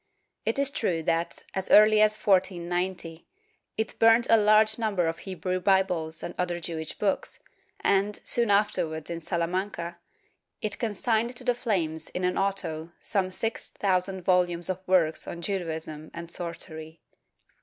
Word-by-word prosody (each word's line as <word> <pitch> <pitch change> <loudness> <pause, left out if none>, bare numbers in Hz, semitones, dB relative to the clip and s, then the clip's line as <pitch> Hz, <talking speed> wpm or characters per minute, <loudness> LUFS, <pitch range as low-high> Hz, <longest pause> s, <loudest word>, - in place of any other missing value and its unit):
It 225 - +1
is 280 0 +1
true 175 -11 -1
that, 165 +1 -1
as 190 -1 -2
early 215 0 +7
as 215 0 +4
1490, 180 -3 -1 0.5
it 220 0 -3
burnt 225 +1 +6
a - - +9
large 215 +1 +4
number 205 -6 +1
of 165 0 -2
Hebrew 185 -1 -3
Bibles 180 -4 +1
and 175 - -5
other 175 -1 -1
Jewish 160 -2 -5
books 200 -2 -1 0.4
and, 200 +1 +1
soon 235 -2 +2
afterwards 170 -6 0
in 170 0 -4
Salamanca, 170 0 -2 0.6
it 210 -1 -3
consigned 230 +2 0
to 250 - -5
the 245 -1 +2
flames 170 -10 -1
in 180 - -4
an 180 0 +1
auto 170 -4 -2
some 190 -2 0
six 225 +4 -3
thousand 190 -1 -1
volumes 175 -1 +2
of 185 0 -6
works 175 -4 +2
on 170 - -6
Judaism 160 -5 -4
and 170 0 -7
sorcery. 160 -2 -6
185 Hz, 145 wpm, -27 LUFS, 170-210 Hz, 0.6 s, a